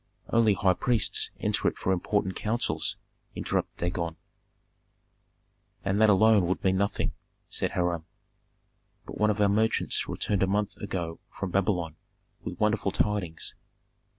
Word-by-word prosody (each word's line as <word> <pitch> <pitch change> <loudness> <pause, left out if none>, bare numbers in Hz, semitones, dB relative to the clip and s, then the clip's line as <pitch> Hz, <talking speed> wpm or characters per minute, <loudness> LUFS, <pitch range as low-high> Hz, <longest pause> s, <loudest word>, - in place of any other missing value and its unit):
"Only 110 -3 +5
high 95 -1 +3
priests 110 +3 +2
enter - - 0
it - - 0
for 95 - 0
important 95 +1 0
counsels," 115 +2 -1 0.4
interrupted - - -2
Dagon. 85 -1 -2 1.7
"And 100 +2 +1
that 110 - +6
alone 105 -2 +5
would 95 - -1
mean 95 0 +3
nothing," 100 +1 0 0.4
said - - -1
Hiram. 85 -2 0 1.0
"But - - -8
one 105 0 +4
of 105 0 0
our 105 - +5
merchants 110 +3 +1
returned 100 -3 -1
a 95 - +4
month 105 +1 0
ago 85 -5 -4
from 95 -2 -5
Babylon, 90 -5 0 0.5
with - - -6
wonderful 105 -2 +2
tidings. 95 -5 -1
100 Hz, 135 wpm, -28 LUFS, 90-105 Hz, 1.7 s, that